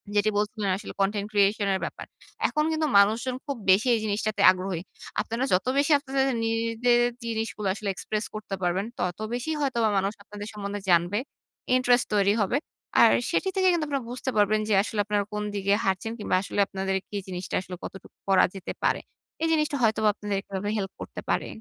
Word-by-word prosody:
যেটি 205 +1 +3
বলছিলেন 210 -1 -1
আসলে 210 - -8
content 200 +1 0
creation 205 0 +3
এর 190 - 0
ব্যাপার। - - -7 0.4
এখন 300 - +1
কিন্তু 315 -1 0
মানুষজন 225 +5 +2
খুব 280 -2 -2
বেশি 200 +7 +4
এই - - 0
জিনিসটাতে 210 +1 -1
আগ্রহী। 185 -2 -3 0.4
আপনারা 230 +3 -3
যত 185 - +2
বেশি 285 +2 +3
আপনাদের 270 -1 0 0.2
নিজের 230 +2 +2 0.2
জিনিসগুলো 225 -2 -3
আসলে 210 -1 -4
express 215 +3 -3
করতে 210 -2 -4
পারবেন, 180 +3 +1
তত 175 +1 -2
বেশি 245 +6 -2
হয়তোবা 235 -6 +1
মানুষ 195 +1 0
আপনাদের 205 0 -8
সম্বন্ধে 205 0 -5
জানবে, 175 +4 +3 0.6
ইন্টারেস্ট 250 -1 +3
তৈরি 200 0 +4
হবে। 205 +6 +1 0.4
আর - - +8 0.2
সেটি 385 - +1
থেকে 380 -1 +3
কিন্তু 330 -3 0
আপনারা 275 -3 -2
বুঝতে 255 +1 -3
পারবেন 210 +1 +4
যে - - +3
আসলে 215 0 -4
আপনারা 205 0 +1
কোন 210 0 -2
দিকে 200 0 +1
হাঁটছেন 190 +4 -1
কিংবা 210 - 0
আসলে 200 - -4
আপনাদের 190 0 -1
কি 205 - -4
জিনিসটা 180 -1 -4
আসলে 185 -1 -8
কতটুকু 190 - -10
করা 190 -1 +6
যেতে 190 - -5
পারে। - - +2 0.4
এই - - +3
জিনিসটা 300 -2 +1
হয়তোবা 220 -1 +3
আপনাদের 205 -2 -3
এভাবে 195 +1 -4
হেল্প 195 -2 -3
করতে - - -7
পারে। - - 0
210 Hz, 185 wpm, -26 LUFS, 195-235 Hz, 0.6 s, আর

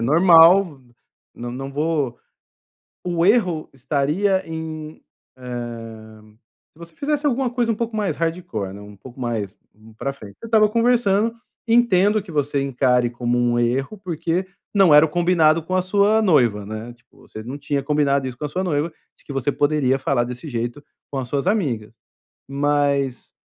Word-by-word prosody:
normal 165 +7 +6
v 120 -2 -25 0.4
não 120 0 -6
não 135 +2 -6
vou 145 -4 -1 0.9
o 175 -1 0
erro 185 -7 +2
estaria 155 +9 0
em, 160 -1 -7 0.4
hã, 115 -3 -8 0.5
se 155 - -24
você 170 -1 -12
fizesse 295 +1 -2
alguma 265 -2 +1
coisa 240 -2 0
um - - -1
pouco 230 0 -3
mais 210 -3 -1
hardcore, 165 - -3
né, 100 - -10
um 105 0 -12
pouco 125 +5 -13
mais 110 -5 -3 0.2
u 110 +1 -18
pra 135 +5 -3
frente. 105 -7 -13
Você 230 - -9
estava 220 -2 +4
conversando, 230 -2 +2 0.3
entendo 215 -3 +3
que 185 - -11
você 145 -2 0
encare 125 -2 +1
como 120 0 -1
um 120 0 +1
erro, 135 - -1
porque 175 +1 -2 0.3
não 195 -7 +5
era 150 +2 +8
o - - -5
combinado 165 -1 +3
com 185 +3 -3
a 185 - +3
sua 205 +3 +3
noiva, 120 - +2
né, 110 +3 -7
tipo, 120 - -23
você 110 - -8
não 130 +4 -6
tinha 140 -1 -2
combinado 140 -2 +1
isso 125 - -6
com 150 - -4
a 145 - -4
sua 185 +5 -2
noiva, 160 -2 -1 0.2
de - - -25
que - - -9
você 135 +1 -1
poderia 145 -2 +1
falar 135 -2 +1
desse 125 +5 -7
jeito 120 +4 -4 0.3
com 135 - -2
as 125 - -5
suas 140 +1 -2
amigas. 130 - -1 0.6
Mas, 140 -2 0
145 Hz, 175 wpm, -21 LUFS, 120-185 Hz, 0.9 s, era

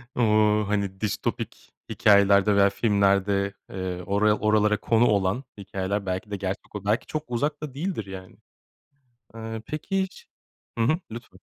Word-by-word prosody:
Bu, 115 -3 +2 0.4
hani, 100 -2 -2
distopik 105 0 -4 0.2
hikâyelerde 100 0 +4
veya 100 0 +5
filmlerde, 100 -1 +1 0.2
eee, 90 -1 -4
oraya 105 +2 +2
oralara 105 0 +3
konu 115 +2 +2
olan 100 +4 +1
hikâyeler 100 0 -3
belki 95 +3 -4
de - - -1
gerçek 95 +1 -5
olur, 100 -1 -6
belki 105 +3 +1
çok 155 0 -4
uzakta 145 +3 -2
değildir 160 - -3
yani. 95 -1 -10 1.0
Eee, 110 -1 -6
peki 190 +6 -2
hiç 190 - -8 0.5
Hı 115 - +3
hı, 155 +7 +2
lütfen. 115 +1 -10
105 Hz, 140 wpm, -25 LUFS, 100-115 Hz, 1.0 s, veya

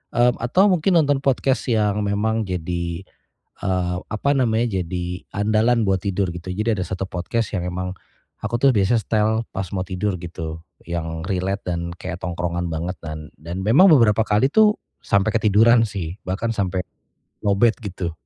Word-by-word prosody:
mmm, 120 0 +3
atau 185 - +3
mungkin 180 +1 +2
nonton 145 -1 +1
podcast 135 -1 +1
yang 105 -3 +1
memang 110 +1 0
jadi, 85 0 -3 0.6
eee, 90 -1 0
apa 110 +6 -2
namanya, 115 -6 +1
jadi 90 +1 -4
andalan 110 +3 +2
buat 95 -2 +1
tidur 95 -2 0
gitu. 90 +2 -6
Jadi 105 -1 0
ada 90 - -1
1 95 +1 -3
podcast 110 +6 -2
yang 90 -4 -2
emang 90 +1 -3 0.5
aku 120 - -1
tuh 140 - +6
biasanya 110 +3 +2
setel 110 0 +1 0.2
pas 95 0 -3
mau 90 - -1
tidur 95 +1 -1
gitu. 80 -1 -6 0.2
Yang 80 0 -4
relate 95 +2 -1
dan 85 0 -4
kayak 90 0 -7
tongkrongan 85 0 -2
banget 85 +3 -3
dan 75 0 -7
dan 85 +4 -6
memang 140 - +6
beberapa 115 -7 +5
kali 110 +6 +2
tuh 215 -1 +5 0.2
sampai 100 +2 +2
ketiduran 115 +2 +5
sih, 95 -4 -5
bahkan 100 +5 -2
sampe, 95 -3 -1 0.6
low 100 -1 +2
batt 115 +1 +3
gitu. 90 -3 -4
100 Hz, 165 wpm, -22 LUFS, 90-115 Hz, 0.6 s, tuh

